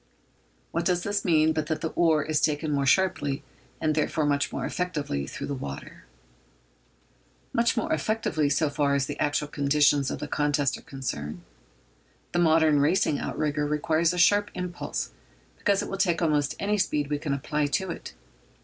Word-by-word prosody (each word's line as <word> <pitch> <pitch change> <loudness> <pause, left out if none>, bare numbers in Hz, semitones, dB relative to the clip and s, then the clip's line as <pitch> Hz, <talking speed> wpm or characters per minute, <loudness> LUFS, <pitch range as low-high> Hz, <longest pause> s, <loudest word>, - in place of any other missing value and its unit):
What 170 - -1
does 180 0 +1
this 205 0 -1
mean 160 -3 +3
but 155 -1 -2
that 155 -1 -2
the 160 - -1
oar 160 -3 +2
is 155 0 0
taken 150 0 0
more 140 -1 +1
sharply, 145 -5 +2 0.4
and, 155 -1 +1
therefore, 155 0 0
much 140 -1 +1
more - - -3
effectively, 150 - -2
through - - -6
the 145 - -3
water? 70 - -7 1.5
Much 235 0 +2
more 230 - 0
effectively 215 -9 0
so 155 +2 +2
far 140 -1 +1
as 140 -1 +1
the 145 +1 -6
actual 145 0 0
conditions 145 -1 +2
of - - -3
the 150 - -5
contest 145 -2 +1
are - - -10
concerned. 90 - -5 0.9
The 175 - 0
modern 160 -3 +4
racing 150 0 +2
outrigger 150 -1 -1
requires 155 +2 +1
a 180 - -4
sharp 205 +4 +4
impulse, 180 -1 -4 0.5
because 200 -1 +2
it - - -5
will 195 - -4
take 175 -4 +2
almost 150 -4 +1
any 210 +1 0
speed 150 -6 0
we 145 - 0
can 145 -2 -1
apply 150 +2 -1
to 185 +5 -1
it. - - -8
150 Hz, 175 wpm, -27 LUFS, 145-175 Hz, 1.5 s, modern